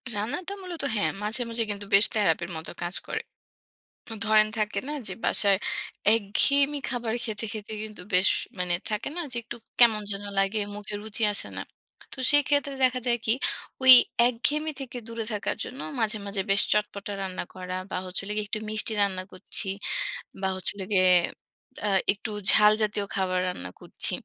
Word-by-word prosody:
রান্নাটা 290 - -3
মূলত 350 -4 -6
হ্যাঁ, 205 - +1
মাঝে, 215 +4 +5
মাঝে 230 0 +1
কিন্তু 205 0 -6
বেশ 200 +3 +9
থেরাপির 175 -4 +1
মতো 160 - -7
কাজ 175 +2 -4
করে। - - -3 1.0
ধরেন, 215 0 +5
থাকে 210 0 -1
না - - -3 0.2
যে - - -4
বাসায় 200 -2 +3 0.6
একঘেয়েমি 280 +7 +3
খাবার 235 -3 -2
খেতে, 220 -1 -4
খেতে 215 -1 -7
কিন্তু 215 -4 -8
বেশ 185 +2 +5 0.3
মানে 180 -1 +1 0.2
থাকে 210 0 -2
না - - -1
যে, - - -1
একটু 240 +1 -7 0.2
কেমন 225 -3 +6
যেন 200 0 -4
লাগে। 195 +2 +1 0.2
মুখে 210 0 -7
রুচি 220 +1 -4
আসে 205 - 0
না। - - -3 0.5
তো - - -7
সেক্ষেত্রে 285 -1 +3
দেখা 255 0 +2
যায় 240 -1 +2
কি 220 - +4 0.5
ওই 260 0 +10 0.4
একঘেমি 290 +6 0
থেকে 255 -2 -6
দূরে 230 -1 -4
থাকার 205 0 -2
জন্য 260 - -8 0.2
মাঝে, 215 -1 0
মাঝে 200 -1 -2
বেশ 200 +1 +5
চটপটা 205 -1 -1
রান্না 185 -2 -4
করা 185 0 -6 0.2
বা, - - -3
হচ্ছে 180 0 -3
হলো 200 +2 -5
গিয়ে 210 -1 -2
একটু 215 - -2
মিষ্টি 215 +1 +4
রান্না 190 -2 -1
করছি 185 +2 0 0.8
বা, 190 - +1
হচ্ছে 185 - 0
হলো 195 -2 -6
গিয়ে 185 -1 +5 0.8
আ - - +1 0.2
একটু 210 +2 -7 0.2
ঝাল 210 -1 +6
জাতীয় 210 -1 0
খাবার 185 -1 0
রান্না 90 - -5
করছি। - - -4
210 Hz, 175 wpm, -26 LUFS, 195-235 Hz, 1.0 s, ওই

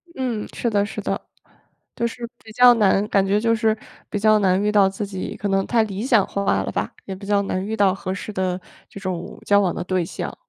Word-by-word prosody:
嗯， 240 -5 -2
是 235 - -1
的 205 -2 +2
是 - - -6
的。 - - -4 0.7
就 235 - 0
是 235 0 -6 0.2
比 220 - -12
较 245 +1 +7
难， 205 -2 +3
感 195 -1 +3
觉 200 +2 +2
就 230 +1 +2
是 220 -1 +1 0.3
比 - - -2
较 215 +1 +5
难 190 -1 +2
遇 210 +1 +1
到， 200 -2 +5
自 195 +2 -4
己 190 -2 -5
可 205 - -2
能 195 0 +1
太 230 -2 +3
理 205 -1 -4
想 235 -6 +4
化 195 - 0
了 - - -4
吧， 100 +3 -2
也 190 - -5
比 195 +1 -10
较 205 -1 +3
难 185 -1 -2
遇 220 +2 -3
到 195 -3 +4
合 190 -1 -5
适 210 +2 -6
的 185 -1 -1 0.3
这 200 - -10
种 185 -3 -5
交 200 0 +5
往 185 -3 +1
的 - - -3
对 185 -1 0
象。 165 - -5
200 Hz, 260 characters per minute, -22 LUFS, 190-220 Hz, 0.7 s, 较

